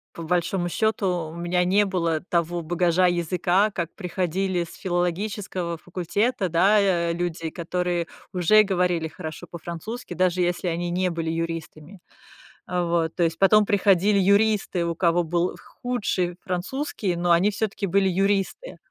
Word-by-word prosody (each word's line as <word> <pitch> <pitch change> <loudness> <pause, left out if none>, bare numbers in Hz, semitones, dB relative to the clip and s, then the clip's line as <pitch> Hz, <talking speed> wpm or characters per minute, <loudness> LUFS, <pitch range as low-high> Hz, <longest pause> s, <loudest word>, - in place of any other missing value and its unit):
по - - -7
большому 175 +2 0
счёту, 185 -5 0
у - - -10
меня 175 +1 0
не 200 +3 +3
было 170 -4 0
того 170 0 0
багажа 175 +2 +2
языка, 175 +4 +1
как 170 -4 -4
приходили 185 -1 -1
с 165 - -11
филологического 180 0 -2
факультета. 185 +4 -1
Да 190 +6 +4
я 175 -4 +2
люди, 170 -2 -3
которые 175 0 -2 0.3
уже 185 +4 +5
говорили 180 -4 0
хорошо 160 +1 -8
по-французски, 170 +8 -7
даже 185 0 +1
если 175 +1 0
они 175 +1 -2
не 180 +1 +1
были 165 -1 -3
юристами. 165 +2 -5 0.7
А, 180 -1 -1
вот, 165 -1 0
то 175 - +2
есть 165 0 0
потом 210 +2 +5
приходили 200 -1 +3
юристы, 200 -2 +2
у 170 - -2
кого 175 0 +2
был 175 +2 -1 0.2
худший 200 -8 -1
французский, 190 - -2
но 175 0 +1
они 180 +5 +4
всё-таки 205 -1 -2
были 195 +1 +2
юристы, 195 - 0
180 Hz, 145 wpm, -24 LUFS, 170-195 Hz, 0.7 s, уже